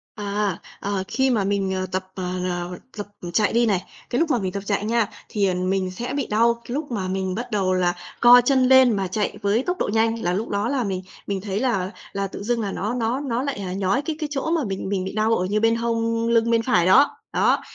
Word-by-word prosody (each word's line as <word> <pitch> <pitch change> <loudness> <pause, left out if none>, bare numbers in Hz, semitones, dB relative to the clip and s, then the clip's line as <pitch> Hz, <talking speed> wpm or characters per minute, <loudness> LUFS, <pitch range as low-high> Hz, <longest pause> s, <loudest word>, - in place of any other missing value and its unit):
À, 205 -3 -1 0.2
ờ, 200 -1 -2
khi 265 0 +1
mà 220 -5 +2
mình, 195 -1 0
ờ, 185 0 -1
tập, 185 0 -2
ờ, 185 - -4 0.2
ờ, 175 0 -3 0.2
tập 205 - -5 0.3
chạy 210 +3 +2
đi 235 +1 +4
này, 195 -5 +1 0.3
cái 245 - 0
lúc 330 -1 +2
mà 245 - +2
mình 190 -3 -2
tập 200 +1 -5
chạy 205 0 -1
nha, 230 -1 +2 0.2
thì, 205 -2 +1
ờ, 185 - +1
mình 185 +1 -1
sẽ 240 +7 -5
bị 280 -2 -2
đau 230 +2 +3
cái 240 - -6
lúc 295 -1 -3
mà 200 -5 -2
mình 190 0 -2
bắt 240 +3 -5
đầu 190 -3 +1
là 175 -1 +2 0.3
co 245 +1 +8
chân 265 -1 +4
lên 255 -2 +6
mà 195 -1 -1
chạy 205 +3 -2
với 205 +4 +1
tốc 360 +5 -2
độ - - 0
nhanh, 225 +1 +1
là 175 - +1
lúc 215 +5 -2
đó 205 +2 0
là 270 -2 0
mình 190 -3 -2 0.3
mình 195 -1 -2
thấy 200 0 -2
là 200 -7 0 0.2
là 200 0 -1
tự 195 - -8
dưng 235 +1 0
là 200 - -2
nó 210 +5 -2
nó 240 +1 -1
nó 260 -3 -2
lại, 280 -4 -3
ờ, - - -4
nhói 195 +7 +1
cái 310 +2 -3
cái 305 -2 -3
chỗ 290 +3 -2
mà 330 -3 +1
mình 195 -1 -4
mình 195 -2 -1
bị 190 - -5
đau 220 +1 +2
ở 180 - 0
như 205 +3 0
bên 225 +1 +3
hông 230 0 0
lưng 230 0 +3
bên 230 -1 +3
phải 200 -8 +2
đó. 265 +10 +5 0.2
Đó, - - +3
210 Hz, 260 wpm, -23 LUFS, 190-240 Hz, 0.3 s, co